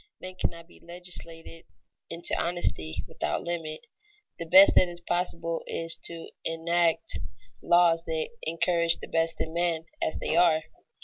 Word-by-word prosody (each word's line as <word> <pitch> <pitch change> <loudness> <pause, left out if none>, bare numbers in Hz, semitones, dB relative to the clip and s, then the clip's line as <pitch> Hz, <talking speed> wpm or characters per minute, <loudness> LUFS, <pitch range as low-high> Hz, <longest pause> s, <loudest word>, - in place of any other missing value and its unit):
Men 185 0 -8
cannot 170 -2 -4
be - - -19
legislated 170 -1 -10 0.4
into 170 - -1
honesty 170 - -2
without 75 - -3
limit. 165 +2 -5 0.5
The 170 - -5
best 190 +4 +8
that 185 - +5
is 175 0 -7
possible 170 -1 -2
is 165 0 +1
to 170 -1 -3 0.2
enact 165 0 0 0.4
laws 175 -1 +4
that 160 -1 -2
encourage 170 +1 +2
the - - -9
best 165 0 +1
in 160 - -3
men 170 -1 0 0.2
as - - 0
they - - -2
are. 160 -3 +4
170 Hz, 140 wpm, -27 LUFS, 165-175 Hz, 0.5 s, best